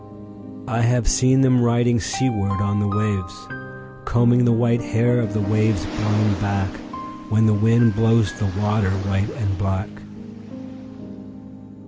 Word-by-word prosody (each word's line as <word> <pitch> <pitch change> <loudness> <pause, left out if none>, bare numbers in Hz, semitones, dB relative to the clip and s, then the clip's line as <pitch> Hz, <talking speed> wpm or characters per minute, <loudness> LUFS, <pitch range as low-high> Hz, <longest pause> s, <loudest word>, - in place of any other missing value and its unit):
I 115 +1 -1
have 120 -1 +1
seen 130 0 +3
them 125 -2 +3
riding 120 0 +2
seaward 100 -2 -2
on 105 0 -1
the 105 - 0
wavesCombing 95 - -2
the 120 - +3
white 115 +1 +1
hair 120 +2 0
of 110 -3 -2
the 105 - 0
waves 105 0 0
blown 105 0 -1
backWhen 110 - -3
the 110 - +3
wind 115 +2 +3
blows 115 -4 +2
the 105 - -1
water 105 -1 0
white 100 +1 -2
and 100 -4 -3
black. 95 +1 -2
105 Hz, 125 wpm, -21 LUFS, 100-120 Hz, -, seen